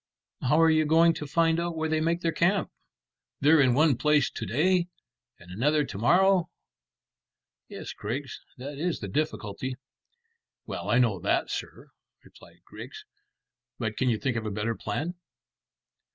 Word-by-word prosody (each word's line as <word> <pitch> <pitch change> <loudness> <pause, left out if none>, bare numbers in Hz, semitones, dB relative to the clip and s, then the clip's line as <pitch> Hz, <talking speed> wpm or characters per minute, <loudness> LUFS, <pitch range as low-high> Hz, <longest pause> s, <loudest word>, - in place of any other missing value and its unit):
"How 150 +5 +2
are 165 0 +5
you 155 0 +3
going 165 +2 +5
to 150 - -6
find 165 +2 +2
out 170 -1 -2
where 160 0 -1
they 155 0 0
make 170 +2 0
their 165 - 0
camp? 185 +4 +1 0.7
They're 150 +2 +5
in 125 -3 +3
one 150 -1 +4
place 150 -2 +2
to - - -6
day 175 - +2 0.5
and 90 0 -15
another 145 +9 +1
to 100 - -7
morrow." 180 - +3 1.2
"Yes, - - -8
Griggs, 130 +6 -5 0.2
that 140 +3 -7
is 175 +1 -1
the 100 - -5
difficulty." 130 0 -3 0.9
"Well, - - -5
I 120 - +3
know 115 -7 +2
that, - - 0
sir," - - -7 0.3
replied - - -19
Griggs; - - -10 0.7
"but 110 -1 -3
can 130 - +1
you 115 - +1
think 125 +1 -2
of 110 - -4
a - - -1
better 105 +3 -2
plan?" 145 +11 -4
150 Hz, 160 wpm, -27 LUFS, 120-165 Hz, 1.2 s, are